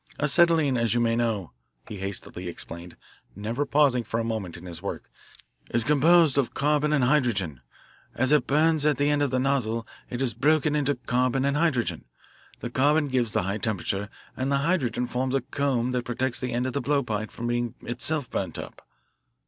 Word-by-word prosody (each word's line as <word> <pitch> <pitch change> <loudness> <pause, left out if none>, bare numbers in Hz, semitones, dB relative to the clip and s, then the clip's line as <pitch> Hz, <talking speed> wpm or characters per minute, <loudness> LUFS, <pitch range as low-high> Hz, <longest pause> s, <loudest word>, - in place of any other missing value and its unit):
"Acetylene, 150 -2 +4
as 115 -1 +1
you - - +3
may 115 -1 +2
know," 115 -7 -1 0.4
he 105 - -7
hastily 95 -2 -5
explained, 85 0 -8 0.4
never 115 +8 -2
pausing 140 -5 +3
for 115 - -2
a - - 0
moment 110 -7 -4
in 85 - -12
his 85 -2 -5
work, 100 - -6 0.6
"is 115 - +1
composed 150 +2 +4
of 135 - -1
carbon 150 +1 +2
and 145 -4 +2
hydrogen. 115 - +1 0.5
As 130 +3 +2
it 150 -4 +4
burns 155 +1 +3
at 150 -2 +3
the 145 +1 +2
end 145 0 +1
of 145 - +2
the 130 - 0
nozzle 125 -4 0 0.2
it 120 - -4
is 130 -3 0
broken 150 0 +2
into 145 -1 +1
carbon 125 +2 0
and 140 0 +1
hydrogen 150 -7 0 0.6
the 120 - -5
carbon 145 +3 +2
gives 125 -4 0
the - - +1
high 100 +3 -2
temperature, 100 -1 -2 0.3
and 130 +1 -2
the 140 - +3
hydrogen 125 -9 +1
forms 130 +2 -1
a 135 - +2
cone 130 -2 -1
that 125 -1 -1
protects 125 +1 -2
the 125 -1 -3
end 120 +1 0
of 130 - -2
the 140 - -1
blowpipe 120 -7 -1
from 120 - -7
being 120 -1 -1
itself 130 +3 -2
burnt - - -3
up." - - -9
125 Hz, 190 wpm, -26 LUFS, 115-145 Hz, 0.6 s, Acetylene